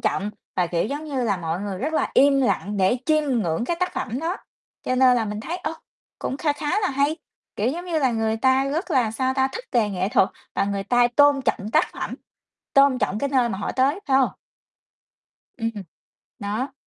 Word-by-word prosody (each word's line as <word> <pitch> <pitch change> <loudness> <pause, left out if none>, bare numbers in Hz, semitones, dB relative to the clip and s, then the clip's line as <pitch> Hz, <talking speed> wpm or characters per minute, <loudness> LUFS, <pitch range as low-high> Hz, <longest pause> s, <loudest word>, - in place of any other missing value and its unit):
trọng, 205 +2 -1 0.3
và, 180 - +2
kiểu 170 0 0
giống 290 +6 -4
như 270 -5 -2
là, 200 -3 +1
mọi 170 0 -3
người 200 -2 -4
rất 300 +6 -2
là - - 0
im 275 0 +5
lặng 210 -5 0
để 195 +5 +3
chiêm 310 -1 +3 0.2
ngưỡng 165 +6 -1
cái 340 - -1
tác 365 0 0
phẩm 245 +1 -3
đó. 340 +4 -2 0.5
Cho 255 - -1
nên 255 -1 +5
là 230 - +1
mình 210 0 -4
thấy, 335 +10 -4
ơ, 365 - -4 0.5
cũng 265 - -3
kha 295 0 +1
khá 295 +7 -1
là 390 - +1
hay, 280 +3 +1 0.4
kiểu 210 +4 +1
giống 340 +7 -3
như 340 -3 -1
là, 265 -4 +2
người 225 -1 0
ta 260 +3 +3
rất 315 +7 -2
là, 250 -7 +2
sao 260 +3 -1
ta, 265 0 +2
thích 480 - -6
về 230 -4 +3
nghệ 190 0 -1
thuật 195 -2 +3 0.3
và - - +1
người 200 0 -2
ta 245 +3 +4
tôn 290 -2 +5
trọng 210 -3 -1
tác 310 - +4
phẩm, - - -5 0.6
tôn 275 -1 +5
trọng 210 - -1
cái 280 - -1
nơi 255 -3 +2
mà 195 - -3
họ 200 - -3
tới, 275 +8 +1
phải 270 -1 +3
hông? 265 - +3 1.3
Ừm. 225 -1 -1 0.7
Đó. 215 +7 -3
255 Hz, 220 wpm, -23 LUFS, 210-285 Hz, 1.3 s, im